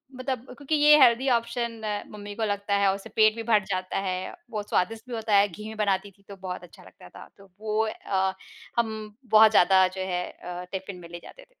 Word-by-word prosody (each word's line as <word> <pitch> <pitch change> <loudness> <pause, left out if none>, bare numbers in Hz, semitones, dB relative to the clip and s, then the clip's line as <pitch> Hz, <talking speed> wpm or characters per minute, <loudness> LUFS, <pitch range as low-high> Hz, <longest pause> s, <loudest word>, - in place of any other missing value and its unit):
मतलब 255 -1 -3 0.2
क्योंकि 285 +2 -1
ये 300 0 +7
हेल्दी 245 +1 +5
ऑप्शन 235 0 -3 0.3
मम्मी 205 -1 -8
को 225 - -3
लगता 205 -1 -1
है, 200 -1 +3
उससे 200 +3 -10
पेट 215 0 +5
भी 230 - -5
भर 215 -3 +3
जाता 185 -1 -3
है। 185 0 -3 0.2
बहुत 210 -1 -5
स्वादिष्ट 220 +5 0
भी 240 - -4
होता 220 -2 0
है, 200 +1 +6
घी 210 +3 -9
में 220 - -8
बनाती 200 -1 0
थी 200 +1 -29
तो 200 - -8
बहुत 180 -1 -5
अच्छा 175 - -15
लगता - - -16
था। - - -12
तो 195 -1 -18
वो 215 0 -2
अ, 190 -3 -1 0.5
हम 220 -2 -3 0.2
बहुत 220 0 +8
ज़्यादा 190 -2 +5
जो - - -3
है 180 0 -1
अ, 180 0 -8
टिफ़िन 190 0 -6
में 170 -1 -12
ले 175 - -8
जाते - - -13
थे। - - -21
210 Hz, 220 wpm, -26 LUFS, 190-225 Hz, 0.5 s, बहुत